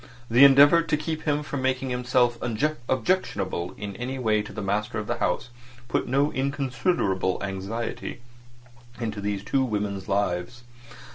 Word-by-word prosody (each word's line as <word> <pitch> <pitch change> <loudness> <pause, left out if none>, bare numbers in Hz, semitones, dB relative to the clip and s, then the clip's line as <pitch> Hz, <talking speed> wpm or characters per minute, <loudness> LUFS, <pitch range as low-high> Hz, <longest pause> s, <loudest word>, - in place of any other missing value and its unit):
The 120 +4 +7
endeavour 145 +4 +8
to 165 -2 0
keep 155 +1 -4
him 150 -1 +1
from 140 -2 -4
making 130 0 0
himself 125 -1 +2
objectionable 120 - -1
in 100 -1 -6
any 130 +2 -4
way 110 -4 +2
to - - -9
the 105 - -5
master 105 +2 -1
of 105 - -3
the 120 +2 -3
house - - -1 0.4
put - - 0
no 140 +4 +2
inconsiderable 130 - 0
anxiety 100 +6 -4 0.8
into 110 -3 -3
these 100 -1 -2
two 135 +5 +1
women's 100 -5 -2
lives. 100 +3 -1
120 Hz, 145 wpm, -25 LUFS, 105-135 Hz, 0.8 s, endeavour